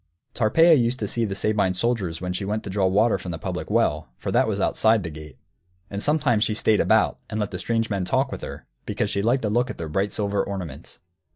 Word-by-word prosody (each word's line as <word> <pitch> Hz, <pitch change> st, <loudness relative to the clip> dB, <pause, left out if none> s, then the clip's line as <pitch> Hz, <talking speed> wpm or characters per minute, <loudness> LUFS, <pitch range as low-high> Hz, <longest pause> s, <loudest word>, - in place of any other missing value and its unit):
Tarpeia 160 Hz, +9 st, +5 dB
used 125 Hz, -3 st, +2 dB
to 105 Hz, -, -1 dB
see 115 Hz, +3 st, 0 dB
the 100 Hz, -2 st, -3 dB
Sabine 100 Hz, -3 st, +1 dB
soldiers 95 Hz, -6 st, -1 dB
when 90 Hz, 0 st, -3 dB
she 95 Hz, -, -3 dB
went 105 Hz, +2 st, -2 dB
to 100 Hz, -, -6 dB
draw 95 Hz, -1 st, +2 dB
water 105 Hz, +5 st, +3 dB
from 90 Hz, -, -7 dB
the 85 Hz, -, -4 dB
public 80 Hz, -, -5 dB
well, -, -, +1 dB
for -, -, -4 dB
that -, -, +3 dB
was -, -, -1 dB
outside 110 Hz, -2 st, +2 dB
the 80 Hz, -, -5 dB
gate. 75 Hz, -2 st, -11 dB, 0.5 s
And 100 Hz, 0 st, -4 dB
sometimes 140 Hz, -7 st, +2 dB
she 110 Hz, -, 0 dB
stayed 110 Hz, -1 st, +3 dB
about -, -, +3 dB
and 110 Hz, -, -3 dB
let 105 Hz, -1 st, -2 dB
the -, -, -5 dB
strange 115 Hz, -1 st, -1 dB
men 100 Hz, -2 st, 0 dB
talk 90 Hz, -, 0 dB
with -, -, -6 dB
her, -, -, -8 dB, 0.2 s
because -, -, -1 dB
she 100 Hz, -, 0 dB
liked 120 Hz, +5 st, +1 dB
to 105 Hz, -, 0 dB
look 120 Hz, +3 st, +1 dB
at -, -, -6 dB
their 80 Hz, -2 st, -5 dB
bright 95 Hz, +5 st, 0 dB
silver 100 Hz, -1 st, -1 dB
ornaments. 90 Hz, -8 st, -7 dB
105 Hz, 245 wpm, -24 LUFS, 95-115 Hz, 0.5 s, Tarpeia